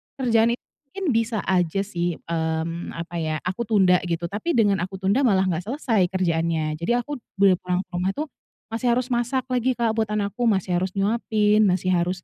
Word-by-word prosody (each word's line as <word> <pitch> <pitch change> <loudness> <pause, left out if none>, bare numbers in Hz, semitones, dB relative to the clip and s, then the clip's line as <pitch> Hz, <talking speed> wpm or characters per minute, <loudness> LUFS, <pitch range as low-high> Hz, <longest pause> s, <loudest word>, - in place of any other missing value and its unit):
kerjaan 235 -3 +2
itu - - -47 0.3
mungkin 390 +4 -5
bisa 225 -2 0
aja 185 0 +1
sih, 175 -4 -2
mmm, 165 +1 -3
apa 170 +1 -6
ya, 155 -1 -1
aku 190 +5 -3
tunda 190 -5 +4
gitu. 170 +1 -2
Tapi 245 +11 -1
dengan 205 -5 +3
aku 190 +2 -4
tunda 200 +8 +2
malah 190 -4 +3
enggak 180 +1 -2
selesai 225 - +1
kerjaannya. 165 -4 -1
Jadi 210 +8 +1
aku 280 +3 -3 0.2
boleh 195 -2 +4
pulang 180 +1 -1
ke - - -57
rumah 185 +2 0
itu 300 - -1 0.5
masih 230 +2 -2
harus 250 0 -1
masak 245 +2 0
lagi, 250 +1 +1
Kak, 235 -2 +1
buat 220 -1 0
anakku, 210 +3 -1
masih 190 -4 +1
harus 185 +1 -3
nyuapin, 210 0 +2
masih 185 0 +1
harus, 180 0 0
195 Hz, 190 wpm, -24 LUFS, 175-230 Hz, 0.5 s, tunda